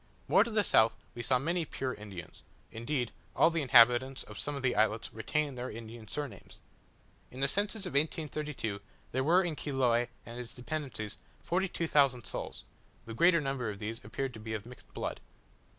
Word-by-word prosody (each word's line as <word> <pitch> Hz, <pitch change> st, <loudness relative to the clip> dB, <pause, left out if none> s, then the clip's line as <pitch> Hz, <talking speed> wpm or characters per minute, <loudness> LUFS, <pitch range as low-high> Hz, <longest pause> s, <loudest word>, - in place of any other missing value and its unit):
More -, -, +6 dB
to 235 Hz, -, -5 dB
the 215 Hz, -2 st, +2 dB
south 110 Hz, -, +5 dB, 0.2 s
we 120 Hz, -, -5 dB
saw 125 Hz, +2 st, +3 dB
many 170 Hz, +6 st, 0 dB
pure 130 Hz, -4 st, -3 dB
Indians: 100 Hz, -5 st, -9 dB, 0.3 s
indeed, 120 Hz, +1 st, -2 dB, 0.2 s
all 165 Hz, -, +5 dB
the 165 Hz, -1 st, +1 dB
inhabitants 125 Hz, 0 st, +6 dB
of 105 Hz, -, -10 dB
some 145 Hz, -, -2 dB
of 140 Hz, -, -5 dB
the 125 Hz, -2 st, +2 dB
islets 110 Hz, +1 st, +1 dB
retain 145 Hz, +6 st, -1 dB
their 125 Hz, 0 st, -4 dB
Indian 115 Hz, 0 st, -9 dB
surnames. 135 Hz, -6 st, -6 dB, 0.7 s
In 130 Hz, -, -9 dB
the 140 Hz, -, +3 dB
census 205 Hz, +5 st, 0 dB
of 180 Hz, -, -4 dB
1832, 150 Hz, -7 st, -1 dB, 0.3 s
there 130 Hz, +1 st, 0 dB
were 175 Hz, +6 st, +5 dB
in 170 Hz, -3 st, -2 dB
Chiloe 125 Hz, -5 st, +1 dB, 0.2 s
and 120 Hz, +1 st, -7 dB
its 120 Hz, -2 st, -8 dB
dependencies 125 Hz, -6 st, -4 dB, 0.3 s
forty 185 Hz, +3 st, +1 dB
two 170 Hz, -, -2 dB
thousand 135 Hz, -6 st, +3 dB
souls; -, -, -5 dB, 0.4 s
the 115 Hz, -, -7 dB
greater 170 Hz, +7 st, +5 dB
number 135 Hz, -5 st, -1 dB
of 100 Hz, -, -5 dB
these 110 Hz, +2 st, -5 dB
appear 135 Hz, +6 st, -2 dB
to 120 Hz, -4 st, -10 dB
be 110 Hz, 0 st, -4 dB
of 105 Hz, 0 st, -5 dB
mixed 125 Hz, +1 st, -13 dB
blood. -, -, -4 dB
130 Hz, 185 wpm, -32 LUFS, 115-150 Hz, 0.7 s, More